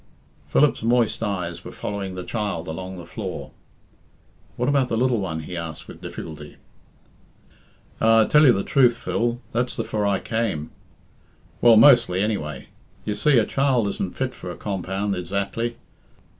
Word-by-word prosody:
Philip's 150 0 +3
moist 115 0 +2
eyes 90 -6 -3
were - - -8
following 100 -2 -5
the 90 - -5
child 100 -7 -3
along 95 +3 -6
the 85 - -9
floor. 85 - -6 1.0
"What 125 - -1
about 140 -3 +2
the 115 - 0
little 125 -1 +2
one?" 85 -5 -3
he 90 +3 -7
asked 85 -2 -6
with - - -12
difficulty. 75 -2 -8 1.5
"Ah 115 0 +6
I - - +4
tell 150 +5 +5
you - - +8
the 100 -4 0
truth, 125 -4 +3
Phil, 120 +1 -1
that's 125 +1 -1
the - - -2
for 105 -1 -2
I 100 -1 +2
came. 110 -10 -2 0.9
Well, 115 -2 +7
mostly, 120 -7 +6
anyway. 75 -10 -2 0.4
You 105 - -1
see, 140 +5 +3
a 110 - +4
child 135 -5 +1
isn't 95 -2 -4
fit 130 -1 -1
for 90 - -8
a - - -7
compound 100 0 -2
ezactly. 100 +6 -2
105 Hz, 160 wpm, -23 LUFS, 90-120 Hz, 1.5 s, you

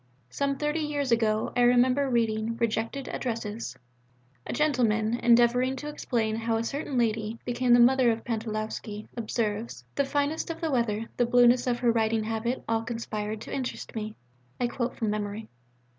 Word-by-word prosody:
Some 280 - 0
thirty 300 +2 -1
years 290 -4 -1
ago 220 -2 +1
I 245 - +3
remember 250 +3 +4
reading 230 -1 0
Rejected 230 +4 -1
Addresses. 230 -3 -4 0.7
A - - -3
gentleman, 235 -7 +1
endeavouring 240 +2 +4
to 295 +3 -6
explain 225 -7 -1
how 225 0 0
a 225 - -1
certain 280 +2 -3
lady 225 -1 0
'became 245 0 0
the 240 - +7
mother 255 +1 +5
of 225 - +2
the - - -15
Pantalowski' 215 -2 -4
observes, 225 -1 -3
'The 280 - +1
fineness 290 +4 -1
of 330 - -4
the 325 -2 -1
weather, 230 -4 0
the 245 - +2
blueness 245 +1 +5
of 245 -1 +1
her 240 -1 +3
riding 225 -1 +1
habit 225 +3 -2
all 225 0 +1
conspired 220 -2 -4
to - - -7
interest 260 -2 -4
me' 215 0 -4 0.4
(I 245 - +1
quote 240 0 -2
from 220 -2 -1
memory). 210 +1 -4
235 Hz, 170 wpm, -27 LUFS, 220-255 Hz, 0.7 s, the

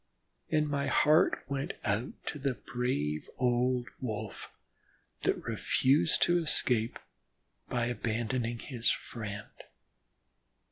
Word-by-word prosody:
And 155 -1 +2
my 140 -1 0
heart 155 +5 +4
went 140 0 -2
out 105 +5 -2
to 150 - -3
the 135 -2 0
brave 75 - -2
old 125 0 +2
Wolf 110 -5 -5 0.7
that - - 0
refused 140 +4 +3
to 175 0 +4
escape 120 -7 +1 0.7
by 120 -1 +1
abandoning 120 0 -1
his 120 -1 0
friend. 105 -3 -4
125 Hz, 100 wpm, -31 LUFS, 115-140 Hz, 0.7 s, heart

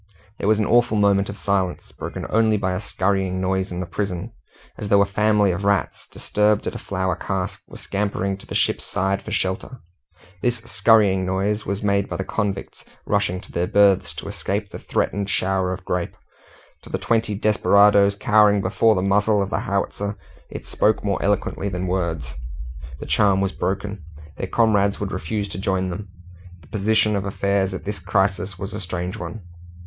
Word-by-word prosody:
There - - -1
was 110 0 +4
an 105 - +1
awful 120 -1 +3
moment 100 -1 +3
of 100 - -6
silence, 95 -3 -1
broken - - -6
only 110 -1 +3
by 95 -2 -1
a 90 - -1
skurrying 95 -2 -1
noise 95 0 -1
in 90 0 -3
the - - -3
prison, 95 +3 -4 0.5
as 105 - -4
though 100 0 +5
a - - 0
family 105 0 +2
of 90 +3 -3
rats, 100 -5 0
disturbed 105 0 +1
at - - -2
a - - -6
flour 95 -2 -1
cask, 95 +1 -3
were - - -11
scampering 100 -1 -2
to - - -15
the - - -5
ship's - - +1
side 95 +1 -1
for - - -9
shelter. 95 +7 -2 0.6
This 120 0 +1
skurrying 100 -2 +4
noise 100 +3 -1
was 100 +2 -2
made 100 -1 +1
by - - -3
the 95 - -2
convicts 100 -1 -3 0.2
rushing 95 -3 0
to 100 - -14
their 85 +1 -1
berths 100 -2 +3
to - - -7
escape 100 +1 -3
the - - -7
threatened 100 0 -1
shower 95 -1 +1
of 95 0 -6
grape; 90 -1 -2 0.6
to - - -14
the - - -1
twenty 115 -2 0
desperadoes 100 -1 +4
cowering 105 0 +4
before 100 +4 +3
the 90 - 0
muzzle 105 +2 +3
of 100 0 -1
the - - 0
howitzer 100 +1 -2 0.3
it - - -8
spoke 105 0 +1
more 100 -1 0
eloquently 100 0 0
than 90 -1 -3
words. 85 -8 -2 0.7
The - - -6
charm 100 -2 +3
was 95 -1 0
broken; 100 -1 -3 0.3
their - - -4
comrades 100 -3 +2
would 100 -2 -3
refuse 100 +4 -2
to 95 - -6
join 95 -1 0
them. 100 +3 -6 0.5
The 75 - -19
position 110 +1 +2
of 100 - -1
affairs 100 -1 0
at - - -8
this 105 +1 -4
crisis 95 -1 0
was 95 +2 -5
a - - -4
strange 90 +2 -4
one. 110 -2 -7
100 Hz, 185 wpm, -22 LUFS, 95-105 Hz, 0.7 s, though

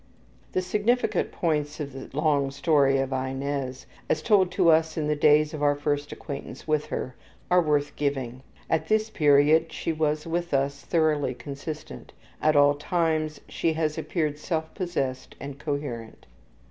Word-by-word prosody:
The 185 - +1
significant 210 +6 +1
points 150 -3 -1
in 145 -2 -4
the 135 0 -9
long 145 -3 +2
story 140 -1 +3
of 135 0 -1
Inez, 130 0 -3 0.2
as 155 - +1
told 195 -5 +4
to 170 - +5
us 160 0 +2
in 155 - 0
the 150 - +1
days 150 +1 +4
of 155 - -5
our 145 0 +3
first 145 0 -2
acquaintance 140 0 -7
with 155 -1 +1
her, 130 - -4 0.4
are 180 0 +6
worth 145 -3 0
giving. 130 -4 -2 0.3
(At 160 - 0
this 215 0 +1
period 150 +1 +4
she 165 - -2
was 155 -1 0
with 170 -1 -1
us 140 +1 0
thoroughly 155 -5 +1
consistent; 145 - -8 0.3
at 155 0 +3
all 145 0 +6
times 155 0 -1
she 165 - 0
has 155 -1 -1
appeared 155 -2 -2
self 160 -1 -3
possessed 140 -9 -3
and 140 0 -7
coherent.) 140 -7 -5
150 Hz, 160 wpm, -26 LUFS, 140-160 Hz, 0.4 s, are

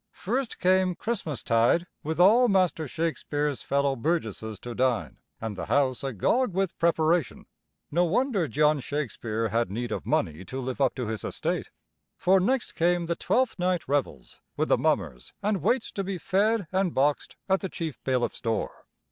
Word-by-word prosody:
First 245 +5 -2
came 185 0 +3
Christmastide, 155 - +1 0.2
with 160 +2 -3
all 225 +7 +6
Master 185 -5 +2
Shakespeare's 150 -2 -2
fellow 140 0 +1
burgesses 115 - -2
to 120 - -6
dine 125 -2 0 0.2
and 110 -2 -4
the - - -5
house 135 -1 +1
agog 170 - 0
with 190 -2 0
preparation. 165 0 +1 0.5
No 175 +4 +3
wonder 205 - +1
John 150 +1 +2
Shakespeare 115 -6 -3
had 115 -1 0
need 115 +3 -4
of - - -4
money 80 +4 0
to 130 +8 -5
live 130 +1 -4
up 130 -3 +2
to 125 - -3
his 110 0 -4
estate, - - -2 0.5
for 190 +1 +4
next 240 +6 0
came 175 0 +1
the 170 0 -1
Twelfth 250 0 0
Night 180 -2 0
revels 140 0 -2 0.2
with - - 0
the - - +5
mummers 60 +1 -1
and 205 -2 0
waits 250 -1 +1
to 195 - -3
be 190 -1 -3
fed 200 +4 +1
and 190 -2 0
boxed 145 +2 +1
at 190 0 +3
the 190 - -4
chief 160 -7 -5
bailiff's 130 -2 -1
door. 115 -2 -3
160 Hz, 165 wpm, -27 LUFS, 130-190 Hz, 0.5 s, all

